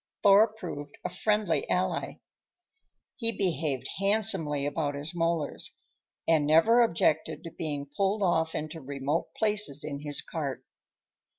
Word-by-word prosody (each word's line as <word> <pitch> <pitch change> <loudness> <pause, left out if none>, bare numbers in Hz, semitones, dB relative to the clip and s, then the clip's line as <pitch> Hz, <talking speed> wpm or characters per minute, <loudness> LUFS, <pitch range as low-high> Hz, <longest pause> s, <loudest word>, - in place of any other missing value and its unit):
Thor 200 +2 +7
proved 175 -10 -8
a - - -2
friendly 210 -1 0
ally. 180 0 0 1.0
He 230 -3 +1
behaved 160 - -1
handsomely 195 -8 +2
about 145 0 -1
his 145 +3 -4
molars, 165 -3 -2 0.5
and 155 -3 +3
never 195 +11 +6
objected 160 -6 +1
to 165 - -7
being 145 -3 -4
pulled 200 +1 +1
off 160 -3 +1
into 155 +1 -4
remote 140 +3 -2
places 210 -10 0
in 145 -2 -5
his 145 -1 -3
cart. 145 -5 -4
165 Hz, 125 wpm, -28 LUFS, 145-195 Hz, 1.0 s, Thor